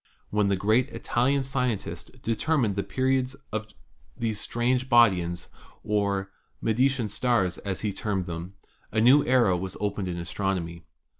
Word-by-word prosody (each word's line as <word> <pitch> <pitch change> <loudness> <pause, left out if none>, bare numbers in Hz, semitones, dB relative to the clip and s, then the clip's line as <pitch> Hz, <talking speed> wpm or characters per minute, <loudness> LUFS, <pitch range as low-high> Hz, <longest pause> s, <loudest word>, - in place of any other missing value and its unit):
When 105 -1 +2
the 100 - +2
great 110 +7 +2
Italian 135 +2 0
scientist 125 -5 -3
determined 115 -2 +1
the 100 - 0
periods 130 +2 0 0.2
of 110 0 -3 0.5
these 110 -3 -2
strange 125 +3 0
bodies, 90 -8 +3 0.4
or 100 -2 0 0.3
"Medicean 125 - +1
stars," 105 -5 0
as 95 -2 -4
he 105 -2 -1
termed 100 -4 -2
them, 85 +2 -6 0.4
a 110 - +1
new 130 +6 +6
era 120 -7 +3
was 95 +2 -4
opened 100 -2 -2
in 90 -1 -3
astronomy. 85 -1 -3
105 Hz, 140 wpm, -27 LUFS, 95-125 Hz, 0.5 s, new